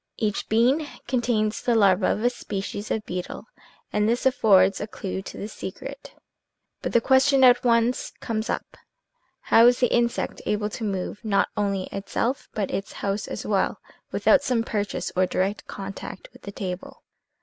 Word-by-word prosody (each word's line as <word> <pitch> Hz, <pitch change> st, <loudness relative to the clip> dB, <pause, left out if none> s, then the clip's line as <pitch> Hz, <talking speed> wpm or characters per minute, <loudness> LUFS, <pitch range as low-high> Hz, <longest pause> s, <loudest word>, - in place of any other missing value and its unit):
Each 210 Hz, -3 st, -2 dB
bean 255 Hz, +8 st, +3 dB, 0.2 s
contains 230 Hz, -4 st, 0 dB
the 240 Hz, -, +1 dB
larva 195 Hz, -3 st, +4 dB
of 215 Hz, -, 0 dB
a 245 Hz, -, +3 dB
species 205 Hz, -2 st, -5 dB
of 215 Hz, -, -2 dB
beetle 180 Hz, 0 st, -5 dB, 0.5 s
and 210 Hz, +1 st, +2 dB
this 240 Hz, +3 st, 0 dB
af 265 Hz, -, +5 dB
fords 195 Hz, -5 st, +4 dB
a 210 Hz, -, -3 dB
clue 190 Hz, -3 st, -5 dB
to -, -, -9 dB
the 205 Hz, -, -5 dB
secret. 270 Hz, +7 st, -8 dB, 0.7 s
But -, -, -3 dB
the 235 Hz, -, +5 dB
question 265 Hz, +2 st, +4 dB
at 250 Hz, -1 st, +6 dB
once 235 Hz, +1 st, +2 dB
comes 220 Hz, -2 st, -3 dB
up: -, -, -4 dB, 0.3 s
" -, -, -46 dB
How 230 Hz, +1 st, +8 dB
is 245 Hz, 0 st, +4 dB
the 250 Hz, -, +2 dB
insect 235 Hz, 0 st, 0 dB
able 210 Hz, 0 st, 0 dB
to 225 Hz, -, -6 dB
move, 200 Hz, +1 st, -3 dB
not 205 Hz, -3 st, +2 dB
only 200 Hz, -2 st, 0 dB
itself, 215 Hz, +6 st, -2 dB
but 205 Hz, -3 st, -1 dB
its 195 Hz, -, -4 dB
house 200 Hz, +1 st, -3 dB
as -, -, -5 dB
well, -, -, 0 dB, 0.3 s
without -, -, +4 dB
some 240 Hz, -3 st, 0 dB
purchase 210 Hz, -3 st, -3 dB
or 185 Hz, 0 st, +3 dB
direct 195 Hz, +3 st, -1 dB
contact 195 Hz, -1 st, -7 dB
with -, -, -17 dB
the 200 Hz, -, -7 dB
table?" 185 Hz, -2 st, -6 dB
215 Hz, 175 wpm, -25 LUFS, 195-240 Hz, 0.7 s, How